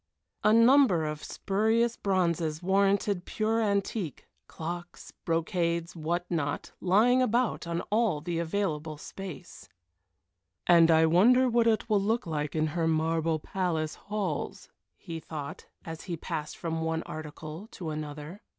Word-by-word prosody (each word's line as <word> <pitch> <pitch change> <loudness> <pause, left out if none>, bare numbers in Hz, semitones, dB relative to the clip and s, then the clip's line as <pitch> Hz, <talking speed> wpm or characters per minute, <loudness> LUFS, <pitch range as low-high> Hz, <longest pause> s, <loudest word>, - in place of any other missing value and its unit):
A 210 - +5
number 230 - +5
of 150 0 -4
spurious 225 +4 +1
bronzes 170 -4 0
warranted 195 0 +2
pure 220 +3 0
antique, 200 - -1 0.2
clocks, 175 +2 -7
brocades, 170 0 0
what 170 +2 -2
not, 145 -4 -2
lying 225 +8 +4
about 240 -6 +1
on 170 0 -1
all 215 -7 +2
the 165 +2 -3
available 160 -3 -2
space. 190 +3 -9 1.0
"And 170 -1 +6
I 160 0 +6
wonder 235 +11 +5
what 235 -1 +3
it 220 0 +2
will 210 -3 +3
look 225 +4 0
like 150 -2 -3
in 155 0 +2
her 165 -2 0
marble 160 0 +1
palace 160 -2 -2
halls," 200 -7 -4 0.3
he 165 -1 -7
thought, 150 -3 -7 0.2
as 165 -1 -7
he 175 -4 -4
passed 150 -1 -5
from 165 -1 -3
one 160 0 -1
article 155 +4 -8
to 165 -4 -5
another. 150 +5 -6
170 Hz, 135 wpm, -29 LUFS, 160-205 Hz, 1.0 s, And